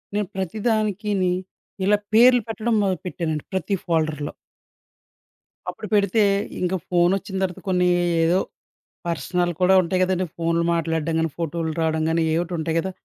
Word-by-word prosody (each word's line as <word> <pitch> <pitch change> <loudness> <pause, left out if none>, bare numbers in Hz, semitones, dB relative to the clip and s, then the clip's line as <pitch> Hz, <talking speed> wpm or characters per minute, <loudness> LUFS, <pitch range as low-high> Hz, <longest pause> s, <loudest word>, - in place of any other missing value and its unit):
నేను 210 -3 0
ప్రతి 190 +2 -3
దానికిని 205 -4 0 0.5
ఇలా 205 +1 +4 0.2
పేర్లు 245 +2 +7
పెట్టడం 225 +1 -1
మొదలుపెట్టానండి, 175 -5 -2
ప్రతి 190 +2 0
ఫోల్డర్‌లో. 155 -3 -1 1.4
అప్పుడు 195 +4 -7
పెడితే 205 +1 +3 0.4
ఇంకా 180 +1 0
ఫోనోచ్చిన 185 +2 +1
తర్వాత 180 -2 -3
కొన్ని 180 -1 +2 0.4
ఏదో 175 +3 +3 0.7
పర్సనల్ 175 +1 -1
కూడా 185 +1 +5
ఉంటాయి 185 +2 -1
కదండీ 185 0 0
ఫోనులు 170 0 0
మాట్లాడడం 165 -1 -1
గాని, 165 0 +1
ఫోటోలు 165 0 -2
రావడం 160 0 +1
గాని 165 0 +1
ఏయోకటుంటయి 165 -1 -1
కదా! 190 +3 -3
180 Hz, 130 wpm, -23 LUFS, 165-195 Hz, 1.4 s, పేర్లు